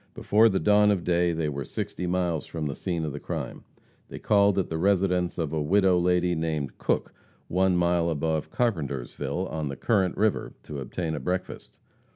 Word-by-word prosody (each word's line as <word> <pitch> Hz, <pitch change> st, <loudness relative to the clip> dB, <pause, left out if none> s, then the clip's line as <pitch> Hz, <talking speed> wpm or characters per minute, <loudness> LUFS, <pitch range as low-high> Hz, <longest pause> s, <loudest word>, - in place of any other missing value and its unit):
Before 110 Hz, +2 st, +4 dB
the 95 Hz, -2 st, 0 dB
dawn 105 Hz, +4 st, +4 dB
of 100 Hz, -4 st, +1 dB
day 85 Hz, 0 st, +2 dB
they 80 Hz, -2 st, -1 dB
were 70 Hz, -1 st, -3 dB
sixty 90 Hz, +6 st, -4 dB
miles 90 Hz, -3 st, -1 dB
from 80 Hz, -2 st, -4 dB
the 70 Hz, -1 st, -3 dB
scene 85 Hz, -4 st, -2 dB
of 75 Hz, -, -4 dB
the 75 Hz, -, -5 dB
crime. -, -, -5 dB, 0.5 s
They -, -, -7 dB
called 100 Hz, -1 st, +3 dB
at 95 Hz, -, +1 dB
the 80 Hz, -, -3 dB
residence 90 Hz, -1 st, +1 dB
of 80 Hz, -3 st, -2 dB
a 80 Hz, -, 0 dB
widow 95 Hz, +3 st, +3 dB
lady 90 Hz, 0 st, +2 dB
named 80 Hz, -4 st, -3 dB
Cook, -, -, -1 dB, 0.4 s
one 95 Hz, 0 st, +2 dB
mile 85 Hz, -1 st, +2 dB
above 80 Hz, 0 st, -1 dB
Carpentersville, 70 Hz, -, -2 dB
on 80 Hz, -2 st, -3 dB
the 70 Hz, -, -4 dB
Current 95 Hz, -, +1 dB
river, 110 Hz, 0 st, 0 dB
to 75 Hz, -, -7 dB
obtain 80 Hz, +5 st, -3 dB
a 75 Hz, -, -3 dB
breakfast. 90 Hz, +1 st, -4 dB
85 Hz, 190 wpm, -26 LUFS, 80-95 Hz, 0.5 s, Before